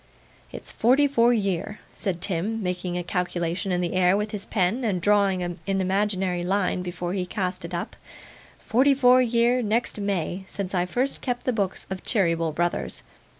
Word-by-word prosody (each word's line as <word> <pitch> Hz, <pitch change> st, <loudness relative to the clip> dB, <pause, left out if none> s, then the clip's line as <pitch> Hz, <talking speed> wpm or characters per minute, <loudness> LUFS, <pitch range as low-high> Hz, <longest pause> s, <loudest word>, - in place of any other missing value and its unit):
'It's -, -, -7 dB
forty 265 Hz, +5 st, +4 dB
four 240 Hz, -3 st, +4 dB
year,' 200 Hz, -2 st, -1 dB
said 185 Hz, -5 st, -3 dB
Tim, 200 Hz, +5 st, -2 dB
making 180 Hz, -1 st, -2 dB
a 175 Hz, -, -2 dB
calculation 175 Hz, 0 st, -2 dB
in 180 Hz, 0 st, +1 dB
the 175 Hz, -, -2 dB
air 185 Hz, +1 st, +4 dB
with 210 Hz, 0 st, -2 dB
his 205 Hz, -3 st, -5 dB
pen, 210 Hz, +5 st, 0 dB
and 200 Hz, -6 st, 0 dB
drawing 200 Hz, -1 st, +2 dB
an 175 Hz, 0 st, -4 dB
imaginary 190 Hz, -1 st, 0 dB
line 185 Hz, 0 st, 0 dB
before 175 Hz, 0 st, -4 dB
he 190 Hz, -2 st, -1 dB
cast 180 Hz, -1 st, -3 dB
it 170 Hz, -, -7 dB
up, 170 Hz, -, -4 dB, 0.6 s
'forty 270 Hz, +5 st, +3 dB
four 255 Hz, -1 st, +6 dB
year, 240 Hz, +1 st, +2 dB
next 225 Hz, 0 st, 0 dB
May, 190 Hz, -2 st, -2 dB
since 195 Hz, -1 st, -5 dB
I 180 Hz, -1 st, +1 dB
first 255 Hz, +8 st, -1 dB
kept 245 Hz, -2 st, -3 dB
the 255 Hz, -, +1 dB
books 200 Hz, -4 st, -2 dB
of 190 Hz, -, -5 dB
Cheeryble, 165 Hz, -5 st, +1 dB
Brothers. 170 Hz, -, -2 dB
195 Hz, 175 wpm, -25 LUFS, 180-220 Hz, 0.6 s, four